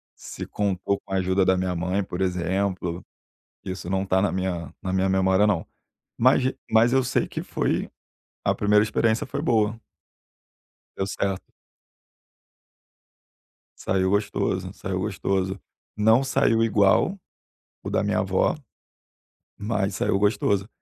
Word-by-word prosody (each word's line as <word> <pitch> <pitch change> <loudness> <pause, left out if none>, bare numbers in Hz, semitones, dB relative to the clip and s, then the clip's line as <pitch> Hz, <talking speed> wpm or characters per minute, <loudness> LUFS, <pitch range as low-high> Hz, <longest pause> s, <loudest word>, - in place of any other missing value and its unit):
se - - -8
contou 100 -1 -1
com 95 - -9
a 95 - +2
ajuda 95 +1 +2
da 95 - +4
minha 90 -1 -1
mãe, 90 +3 -1
por 90 0 -5
exemplo, 90 -1 -1 0.6
isso 95 -2 -6
não 95 0 0
está 95 0 +1
na 100 - +1
minha 90 -5 -3
na 95 - -3
minha 95 0 +2
memória 95 +2 +3
não. 90 -6 0 0.5
Mas 130 +2 +4
g 130 +1 -1
mas 115 +2 +4
eu 135 -1 +3
sei 125 - 0
que - - -5
foi, - - -1 0.5
a - - +2
primeira 105 0 +3
experiência 110 +1 +1
foi 140 +2 -4
boa. 110 -5 +1 1.2
Deu 95 - -1
certo. 100 -1 -3 2.3
Saiu 95 0 +1
gostoso, 100 +2 -1
saiu - - -4
gostoso. 95 0 -1 0.4
Não 110 +4 +4
saiu 120 -4 +2
igual 110 - +3 0.7
o - - -4
da - - +1
minha - - +1
avó, 95 - +1 1.0
mas 100 -2 -1
saiu 95 - +1
gostoso. 100 -1 +1
95 Hz, 135 wpm, -24 LUFS, 95-105 Hz, 2.3 s, da